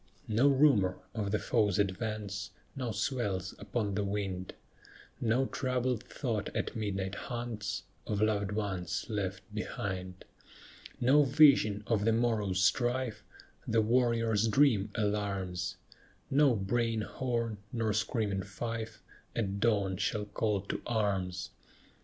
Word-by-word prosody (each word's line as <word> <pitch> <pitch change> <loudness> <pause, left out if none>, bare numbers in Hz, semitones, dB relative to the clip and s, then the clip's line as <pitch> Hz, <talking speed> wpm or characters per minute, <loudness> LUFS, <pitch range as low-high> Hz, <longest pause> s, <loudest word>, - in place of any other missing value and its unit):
No 115 +6 +4
rumor 130 -10 +4 0.2
of 105 -3 -2
the 105 - +2
foe's 105 -5 +1
advance 100 0 -2 0.3
Now 130 -3 -2
swells 105 -4 -1
upon 105 -4 -2
the 105 +1 0
wind; 100 -2 -3 0.6
No 120 +3 +2
troubled 125 -3 -1
thought 115 -8 -2
at - - -2
midnight 100 -3 -2
haunts 120 -1 -4 0.2
Of 105 - -1
loved 105 -2 +1
ones 95 -5 -2
left 95 -3 -2
behind; 95 -3 -4 0.7
No 135 +5 +5
vision 135 -8 +5
of 110 -2 +1
the 115 +1 +3
morrow's 105 -5 +1
strife 120 -1 +1 0.4
The 110 0 +3
warrior's 115 -2 +2
dream 110 -4 +4
alarms; 100 -5 -1 0.6
No 140 -2 +5
braying 115 +3 0
horn 115 -2 -2
nor 115 -3 0
screaming 105 -3 0
fife 115 +3 -5 0.3
At 100 -3 -1
dawn 100 -4 +2
shall 105 +2 -1
call 105 0 0
to 100 - -4
arms. 95 -5 -1
105 Hz, 120 wpm, -31 LUFS, 100-120 Hz, 0.7 s, No